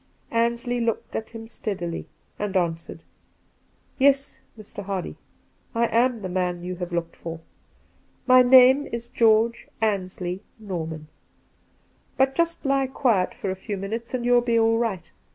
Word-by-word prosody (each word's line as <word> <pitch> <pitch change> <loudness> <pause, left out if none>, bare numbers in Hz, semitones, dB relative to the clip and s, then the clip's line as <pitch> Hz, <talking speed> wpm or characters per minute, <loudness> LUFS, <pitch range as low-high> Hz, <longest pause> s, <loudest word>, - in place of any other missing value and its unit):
Ansley 235 +1 0
looked 230 -1 -2
at 220 - -3
him 225 -1 -9
steadily, 190 -7 -5 0.3
and 205 -2 -1
answered: 165 -2 -2 0.5
' - - -39
Yes, 275 +1 +3 0.2
Mr. 210 -1 -9
Hardy, 195 -2 -4 0.6
I 235 +1 +3
am 235 -1 +2
the - - -2
man 180 -1 -2
you 180 0 -5
have 180 0 -5
looked 170 -1 -3
for. 165 -1 -7 0.9
My 255 0 +7
name 260 +2 +7
is 235 0 -5
George 230 -1 +3
Ansley 185 -3 -2 0.2
Norman. 165 -7 -5 1.1
But 265 0 +3
just 335 +1 0
lie 275 -1 +2
quiet 235 -8 +1
for 195 - -3
a - - -3
few 200 +2 -5
minutes, 225 +6 -4
and 240 -1 -3
you'll; 245 0 +5
be 235 -1 +1
all 225 0 +3
right. 195 -8 -2
225 Hz, 150 wpm, -24 LUFS, 185-245 Hz, 1.1 s, My